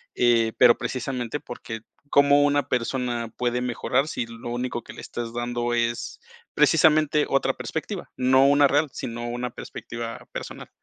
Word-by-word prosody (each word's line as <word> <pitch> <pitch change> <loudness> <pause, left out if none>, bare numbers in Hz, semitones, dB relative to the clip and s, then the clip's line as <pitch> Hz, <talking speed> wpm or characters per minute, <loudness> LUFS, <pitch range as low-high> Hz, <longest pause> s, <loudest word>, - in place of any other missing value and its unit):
eh, 115 -2 +3
pero 120 -2 +7
precisamente, 130 0 -3
porque 115 -4 -8 0.3
cómo 140 0 +5
una 145 -1 +2
persona 120 -1 -1
puede 125 0 0
mejorar 125 +3 0
si 120 - -2
lo 115 +1 -9
único 120 0 -3
que - - -11
le - - -10
estás 115 -1 -5
dando 120 0 -2
es 120 0 -2 0.4
precisamente, 155 -1 +4
otra 135 - +2
perspectiva, - - -5
no 130 +1 +4
una 145 0 +5
real, 145 +2 +2
sino 120 0 -5
una 120 0 -3
perspectiva 115 -1 -7
personal. - - -7
125 Hz, 150 wpm, -25 LUFS, 120-135 Hz, 0.4 s, pero